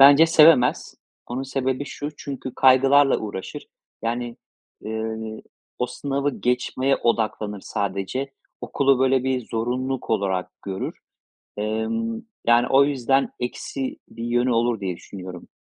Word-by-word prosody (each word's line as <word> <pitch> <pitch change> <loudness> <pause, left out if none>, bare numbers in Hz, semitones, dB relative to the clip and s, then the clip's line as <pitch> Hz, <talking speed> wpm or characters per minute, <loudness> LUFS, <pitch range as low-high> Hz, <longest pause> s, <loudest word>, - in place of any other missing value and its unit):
bence 140 +4 +9
sevemez. 155 -6 +5 0.3
Onun 125 +2 -3
sebebi 130 0 -2
şu: 145 +1 -5
Çünkü 130 -2 -6
kaygılarla 135 +2 +5
uğraşır. 100 -3 -6 0.4
Yani, 120 +1 -2 0.4
eee, 110 0 -5 0.4
o 125 - +1
sınavı 140 +2 -2
geçmeye 125 +2 +1
odaklanır 110 -3 -1
sadece. 100 +8 -3 0.3
Okulu 135 -2 +2
böyle 130 -1 +3
bir 130 -3 -1
zorunluluk 125 +3 -2
olarak 95 -4 -1
görür. 95 -1 -5 0.6
Emm, 110 - -2 0.3
yani 120 +1 +5
o 135 +1 +6
yüzden 135 -1 +1
eksi 130 +2 -4
bir 115 0 -8
yönü 120 +1 +1
olur 115 -1 +1
diye 95 -3 -3
düşünüyorum. 90 0 -9
125 Hz, 120 wpm, -23 LUFS, 110-135 Hz, 0.6 s, bence